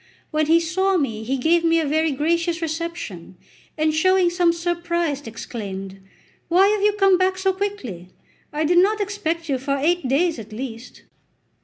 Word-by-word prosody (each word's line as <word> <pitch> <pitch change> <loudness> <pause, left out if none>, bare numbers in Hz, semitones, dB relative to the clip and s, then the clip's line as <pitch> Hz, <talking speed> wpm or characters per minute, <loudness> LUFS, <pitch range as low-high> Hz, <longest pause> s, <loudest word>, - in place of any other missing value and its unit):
When 310 -1 +1
he 330 +1 +5
saw 375 +4 +1
me 225 -8 -2
he 265 +4 -1
gave 330 +6 +2
me 330 0 +3
a 320 - 0
very 315 +2 +1
gracious 335 +4 0
reception, 320 - -5 0.4
and 310 0 +1
showing 370 +2 +3
some 350 -1 +3
surprise, 340 -4 -2
exclaimed: 195 -4 -7 0.5
"Why 375 +4 +4
have 420 -1 +1
you 415 0 +3
come 390 -3 +4
back 375 0 +1
so 380 0 +1
quickly; 370 - -5 0.4
I 305 +1 -1
did 350 +3 +4
not 420 +4 +3
expect 360 -5 -2
you 270 -3 -1
for 275 +1 -1
eight 320 +1 +1
days 310 +3 +1
at 215 0 -10
least." 240 0 -8
330 Hz, 170 wpm, -22 LUFS, 275-355 Hz, 0.5 s, he